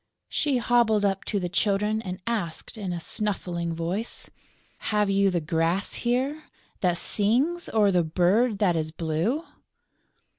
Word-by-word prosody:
She 285 -4 +1
hobbled 230 -3 +3
up 195 -1 0
to 205 - -1
the 180 - -2
Children 210 +3 +1
and 185 -3 -6
asked, 205 -8 -3
in 200 -5 -4
a 175 - -3
snuffling 170 -3 -2
voice: 180 +8 -3 0.6
"Have 210 -2 +2
you 195 0 +3
the 180 -2 0
grass 165 +4 0
here 265 +6 -1 0.3
that 180 -4 +1
sings 255 - +2
or 210 -3 +3
the 180 -2 +3
bird 190 +8 +2
that 190 -4 +2
is 155 -1 -1
blue?" 170 - -1
200 Hz, 145 wpm, -26 LUFS, 175-225 Hz, 0.6 s, hobbled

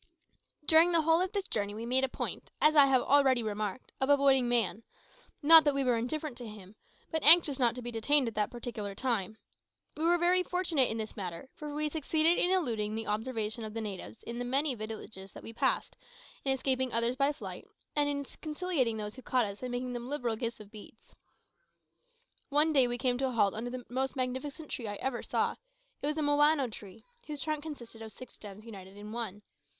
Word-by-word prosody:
During 325 +3 +6
the 330 -2 +3
whole 325 +2 +4
of 370 - -1
this 400 -3 -3
journey 205 -1 -2
we 225 +2 -5
made 255 +2 +2
a 265 - +1
point, - - -5
as 305 +1 +4
I 285 -2 +8
have 260 -2 +3
already 270 -4 +4
remarked, 215 +2 -4
of 265 - +1
avoiding 275 -3 +4
man; 230 -3 +1 0.6
not 320 +2 +9
that 290 -2 +2
we 275 - +1
were 250 -2 +2
indifferent 250 +4 -3
to 240 - -7
him, 210 -2 -12 0.4
but 320 -2 0
anxious 305 -3 +7
not 240 -2 +2
to 250 - -7
be 240 - -5
detained 255 +4 +2
at 230 - -3
that 210 -1 0
particular 225 -4 -6
time. 220 -4 -2 0.6
We 310 - -4
were 345 +1 +4
very 355 +1 +3
fortunate 355 -7 +1
in 225 - -3
this 220 -1 -5
matter, 185 +4 -6
for 300 -1 -7
we 300 +1 -1
succeeded 315 +2 +2
in 355 - +3
eluding 230 - 0
the 225 0 -3
observation 220 0 -3
of 215 0 -7
the - - -2
natives 210 0 -7
of 235 - -5
many 265 +4 0
villages 215 -3 -8
that - - -11
we 225 - -8
passed, - - 0 0.5
in 270 - +2
escaping 260 -1 0
others 230 +2 +1
by 275 +2 +2
flight, 300 - -9 0.3
and 290 -1 +2
in 285 0 -2 0.2
conciliating 305 -7 -1
those 210 -1 -5
who 260 - -11
caught 250 -2 +1
us 200 0 -7
by 255 - -3
making 245 0 -4
them 240 0 -5
liberal 245 -6 -1
gifts 230 0 -4
of 210 -1 -13
beads. 220 +1 -14 1.4
One 300 +2 +3
day 265 -4 +5
we 240 0 -2
came 250 0 0
to 265 - +1
a - - -3
halt 210 -5 +2
under 230 +3 -4
the 250 -1 -7
most 265 +3 -2
magnificent 265 +4 -4
tree 230 - -4
I 205 - -4
ever 245 +3 -3
saw. - - -1 0.4
It - - -1
was 300 +1 -1
a 310 - 0
mowano 290 -3 +3
tree, 210 +1 -12 0.2
whose 295 -2 -4
trunk 310 -1 -2
consisted 245 -7 -9
of 220 -1 -8
six 255 +5 -12
stems 210 +1 -11
united 195 -3 -11
in 210 +1 -9
one. 215 -3 -5
250 Hz, 215 wpm, -31 LUFS, 220-290 Hz, 1.4 s, not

